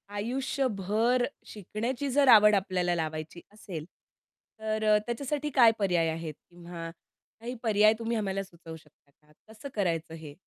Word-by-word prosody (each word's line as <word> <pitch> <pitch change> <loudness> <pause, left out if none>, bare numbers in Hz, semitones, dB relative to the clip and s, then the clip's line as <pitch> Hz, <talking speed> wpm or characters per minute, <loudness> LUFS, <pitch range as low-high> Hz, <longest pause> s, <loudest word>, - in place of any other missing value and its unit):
आयुष्यभर 240 -1 0 0.2
शिकण्याची 230 +7 -4
जर 280 0 +3
आवड 210 -1 +7
आपल्याला 185 -3 0
लावायची 160 +1 -4
असेल 180 -7 -8 0.7
तर 220 0 -2
अ, 215 -1 +5
त्याच्यासाठी 280 +5 -3
काय 235 -3 +7
पर्याय 175 -4 +2
आहेत 160 -1 -4 0.2
किंवा 170 -1 -8 0.5
काही 240 +2 -6
पर्याय 215 -1 +5
तुम्ही 230 0 -2
आम्हाला 195 -2 -2
सुचवू 165 -3 -12
शकता 150 -2 -21
का? 150 0 -26 0.2
कसं 225 +6 -9
करायचं 165 -5 -1
हे? 155 -3 -10
205 Hz, 140 wpm, -28 LUFS, 170-230 Hz, 0.7 s, आवड